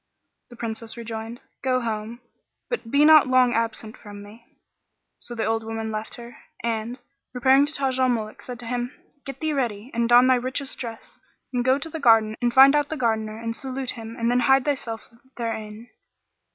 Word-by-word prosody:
The 240 Hz, -, -12 dB
Princess 230 Hz, 0 st, -6 dB
rejoined, 230 Hz, 0 st, -6 dB, 0.2 s
"Go 255 Hz, -1 st, +1 dB
home, 225 Hz, 0 st, -4 dB, 0.5 s
but 465 Hz, -, -4 dB
be 285 Hz, +4 st, +4 dB
not 310 Hz, -3 st, +8 dB
long 255 Hz, -1 st, +4 dB
absent 225 Hz, 0 st, -2 dB
from 205 Hz, -3 st, -11 dB
me." 220 Hz, +3 st, -15 dB, 0.7 s
So 240 Hz, -, -7 dB
the 225 Hz, -, -1 dB
old 225 Hz, +1 st, 0 dB
woman 225 Hz, 0 st, -4 dB
left 215 Hz, 0 st, -5 dB
her 235 Hz, 0 st, -11 dB, 0.3 s
and, 230 Hz, +1 st, -2 dB, 0.4 s
repairing 265 Hz, +3 st, +4 dB
to 295 Hz, -, -4 dB
Taj 265 Hz, -2 st, -1 dB
al 255 Hz, 0 st, +3 dB
Muluk, 220 Hz, -3 st, -3 dB
said 250 Hz, -1 st, -7 dB
to -, -, -9 dB
him, 245 Hz, +2 st, -3 dB, 0.3 s
"Get 275 Hz, -1 st, -7 dB
thee 315 Hz, -1 st, 0 dB
ready 240 Hz, -3 st, -2 dB
and 235 Hz, 0 st, 0 dB
don 245 Hz, +1 st, +7 dB
thy 255 Hz, 0 st, +4 dB
richest 260 Hz, +2 st, -3 dB
dress 230 Hz, -2 st, -8 dB, 0.3 s
and 245 Hz, -1 st, 0 dB
go 260 Hz, +2 st, +3 dB
to 285 Hz, -, -6 dB
the 320 Hz, 0 st, -6 dB
garden 225 Hz, -5 st, +4 dB
and 240 Hz, 0 st, +2 dB
find 270 Hz, +3 st, +7 dB
out 295 Hz, -1 st, +1 dB
the 315 Hz, -, -3 dB
Gardener 220 Hz, -3 st, -1 dB
and 230 Hz, 0 st, -4 dB
salute 265 Hz, +1 st, -4 dB
him 225 Hz, -1 st, -8 dB
and 235 Hz, +1 st, +1 dB
then 245 Hz, -, +3 dB
hide 265 Hz, +1 st, +4 dB
thyself 245 Hz, -6 st, -3 dB, 0.3 s
therein." 220 Hz, -1 st, -5 dB
240 Hz, 190 wpm, -24 LUFS, 225-260 Hz, 0.7 s, not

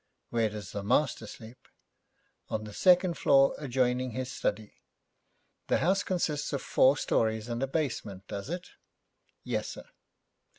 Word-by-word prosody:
'Where 115 Hz, -2 st, +2 dB
does 105 Hz, -2 st, -7 dB
the 100 Hz, -, -4 dB
master 115 Hz, +1 st, +1 dB
sleep?' 110 Hz, +3 st, -12 dB, 0.8 s
'On 110 Hz, -, -2 dB
the 105 Hz, -1 st, -9 dB
second 180 Hz, -, +4 dB
floor, 135 Hz, -1 st, +5 dB
adjoining 125 Hz, -3 st, 0 dB
his 130 Hz, +1 st, -4 dB
study.' 105 Hz, 0 st, -3 dB, 0.9 s
'The -, -, +3 dB
house 190 Hz, +4 st, +2 dB
consists 155 Hz, -5 st, -1 dB
of 140 Hz, -, -2 dB
four 135 Hz, +3 st, +4 dB
stories 110 Hz, -2 st, 0 dB
and 120 Hz, +1 st, -3 dB
a 135 Hz, -, +1 dB
basement, 115 Hz, -, -3 dB
does 100 Hz, +6 st, -6 dB
it?' 175 Hz, +2 st, -5 dB, 0.7 s
'Yes, -, -, -2 dB
sir.' -, -, -9 dB
125 Hz, 140 wpm, -29 LUFS, 110-145 Hz, 0.9 s, floor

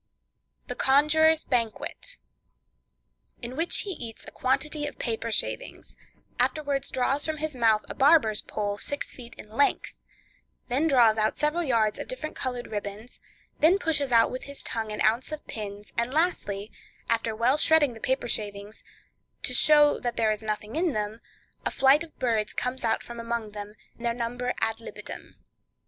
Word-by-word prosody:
The -, -, -4 dB
Conjurer's 310 Hz, +3 st, +4 dB
Banquet.—In 245 Hz, -, -6 dB
which 330 Hz, +4 st, +2 dB
he 405 Hz, -, -5 dB
eats 235 Hz, -10 st, -8 dB
a -, -, -9 dB
quantity 295 Hz, +3 st, 0 dB
of -, -, -8 dB
paper 230 Hz, -2 st, -3 dB
shavings; -, -, -2 dB, 0.4 s
afterwards 285 Hz, -3 st, 0 dB
draws 270 Hz, +3 st, 0 dB
from 315 Hz, -1 st, -1 dB
his 305 Hz, -1 st, -3 dB
mouth 225 Hz, -3 st, +3 dB
a -, -, -6 dB
barber's 265 Hz, -7 st, +4 dB
pole, 205 Hz, -1 st, -3 dB
six 285 Hz, -, -1 dB
feet 240 Hz, -2 st, -11 dB
in -, -, -11 dB
length; 280 Hz, +6 st, +1 dB, 0.8 s
then 275 Hz, +6 st, +2 dB
draws 235 Hz, -6 st, +5 dB
out 215 Hz, 0 st, +1 dB
several 300 Hz, +3 st, +1 dB
yards 230 Hz, -8 st, +1 dB
of -, -, -5 dB
different -, -, -5 dB
colored 250 Hz, -2 st, -2 dB
ribbons; 205 Hz, +2 st, -6 dB, 0.4 s
then 325 Hz, +5 st, +5 dB
pushes 300 Hz, -7 st, 0 dB
out 230 Hz, -1 st, +5 dB
with 255 Hz, -, -5 dB
his 280 Hz, 0 st, -5 dB
tongue 220 Hz, -1 st, -2 dB
an 210 Hz, -, -4 dB
ounce 230 Hz, +7 st, +2 dB
of 305 Hz, -1 st, -6 dB
pins; 205 Hz, -1 st, -7 dB
and 235 Hz, +2 st, 0 dB
lastly, 230 Hz, -, 0 dB, 0.4 s
after 225 Hz, -1 st, 0 dB
well 240 Hz, +6 st, +3 dB
shredding 305 Hz, -4 st, +4 dB
the 225 Hz, -, -11 dB
paper 260 Hz, -2 st, 0 dB
shavings, 205 Hz, -1 st, -4 dB, 0.6 s
to -, -, +1 dB
show 295 Hz, -1 st, +5 dB
that 240 Hz, -1 st, -3 dB
there 220 Hz, -1 st, +3 dB
is 215 Hz, 0 st, -2 dB
nothing 215 Hz, +2 st, -4 dB
in 330 Hz, -1 st, +1 dB
them, 215 Hz, +1 st, -3 dB, 0.4 s
a -, -, +1 dB
flight 275 Hz, +4 st, +4 dB
of 330 Hz, -, -14 dB
birds 225 Hz, -4 st, 0 dB
come 250 Hz, +1 st, -1 dB
out 225 Hz, -, +1 dB
from 235 Hz, 0 st, -9 dB
among 230 Hz, -2 st, -3 dB
them, 205 Hz, 0 st, -8 dB, 0.2 s
their 235 Hz, 0 st, -1 dB
number 245 Hz, +1 st, -2 dB
ad 225 Hz, +1 st, 0 dB
libitum. -, -, -9 dB
245 Hz, 165 wpm, -27 LUFS, 220-295 Hz, 0.8 s, draws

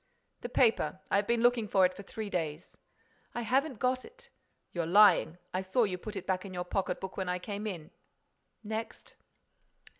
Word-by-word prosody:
"The 240 Hz, -, -6 dB
paper. 220 Hz, -, +2 dB
I've 200 Hz, 0 st, +2 dB
been 235 Hz, 0 st, +2 dB
looking 240 Hz, -3 st, +3 dB
for 190 Hz, -2 st, +4 dB
it 180 Hz, -, +1 dB
for 190 Hz, -, -9 dB
three 205 Hz, +1 st, -6 dB
days." 160 Hz, -2 st, -3 dB, 0.6 s
"I 240 Hz, -, -1 dB
haven't 265 Hz, +3 st, +1 dB
got 255 Hz, +2 st, 0 dB
it." 480 Hz, +1 st, -15 dB, 0.4 s
"You're 170 Hz, -2 st, -1 dB
lying. 180 Hz, -3 st, +6 dB, 0.2 s
I 185 Hz, -, 0 dB
saw 190 Hz, +6 st, +2 dB
you 185 Hz, -4 st, -1 dB
put 215 Hz, +3 st, -7 dB
it 190 Hz, -2 st, -5 dB
back 185 Hz, -1 st, 0 dB
in 190 Hz, -2 st, -8 dB
your 180 Hz, 0 st, -3 dB
pocket 190 Hz, +2 st, -1 dB
book 190 Hz, -1 st, -7 dB
when 190 Hz, -2 st, -2 dB
I 180 Hz, -, 0 dB
came 205 Hz, +3 st, -5 dB
in." 175 Hz, -4 st, -6 dB, 0.7 s
"Next?" 220 Hz, +1 st, -6 dB
200 Hz, 185 wpm, -31 LUFS, 185-230 Hz, 0.7 s, lying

